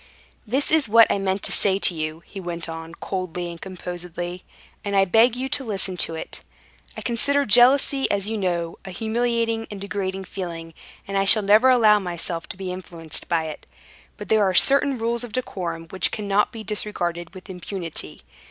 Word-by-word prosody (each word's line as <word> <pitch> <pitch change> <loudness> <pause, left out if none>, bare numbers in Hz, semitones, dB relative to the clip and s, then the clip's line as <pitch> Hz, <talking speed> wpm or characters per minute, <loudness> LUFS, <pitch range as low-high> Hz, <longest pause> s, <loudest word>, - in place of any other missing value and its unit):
"This 265 +6 0
is 310 -7 +3
what 230 +1 +7
I - - 0
meant 190 0 -2
to - - +2
say 195 -2 +3
to 195 - +4
you," 155 0 -5
he 195 - -9
went 170 -2 -5
on 165 0 -8
coldly 180 -2 -5
and 170 - -11
composedly, 180 -1 -6 0.4
"and 200 -1 -3
I 195 0 +5
beg 225 +5 +4
you 260 +2 -3
to 280 - +1
listen 195 -5 -2
to 165 - +1
it. 160 - -8 0.6
I - - -5
consider 280 +4 +1
jealousy, 265 +5 +5
as 200 0 0
you 225 - -2
know, 175 -4 -2
a 195 - -9
humiliating 230 +2 -1
and 205 - -8
degrading 195 -1 -4
feeling, 170 -3 -7 0.3
and 195 0 -1
I 195 - +1
shall 210 +2 +6
never 215 +6 +5
allow 220 -4 +5
myself 170 -2 -4
to - - -7
be 185 -2 -5
influenced 170 -3 -3
by 165 -2 +1
it; 155 -1 -8 0.5
but - - -8
there 220 -1 +4
are 190 -2 +1
certain 275 +5 +5
rules 235 +1 -1
of 235 -3 -8
decorum 175 -9 -4
which 190 -2 +2
cannot 205 -1 0
be 225 -1 -8
disregarded 175 -5 -3
with 185 - -11
impunity. 180 -2 -5
195 Hz, 190 wpm, -23 LUFS, 175-225 Hz, 0.6 s, what